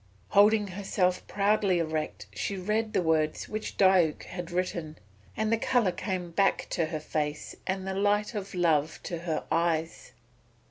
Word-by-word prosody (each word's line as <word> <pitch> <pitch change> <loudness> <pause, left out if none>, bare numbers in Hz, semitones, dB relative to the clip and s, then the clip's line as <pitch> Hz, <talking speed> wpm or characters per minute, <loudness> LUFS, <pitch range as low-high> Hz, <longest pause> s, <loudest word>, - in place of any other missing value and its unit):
Holding 210 0 +5
herself 185 -1 -1
proudly 200 -2 +2
erect, 155 -2 -2
she 200 - -3
read 215 +4 -1
the 180 - +2
words 155 -2 +1
which 215 0 -5
Diuk 185 -5 +4
had 180 -2 -7
written, 175 -3 -3 0.4
and 220 +1 +1
the 225 - +2
colour 235 -6 +2
came 180 -2 -4
back 195 +3 +2
to 165 -2 0
her 155 -1 -3
face 150 -1 -3
and 190 0 -2
the 190 - -2
light 205 +3 +1
of 200 -3 -5
love 160 -3 +2
to 170 - -4
her 165 -2 -2
eyes. 165 -1 0
185 Hz, 155 wpm, -28 LUFS, 165-205 Hz, 0.4 s, Holding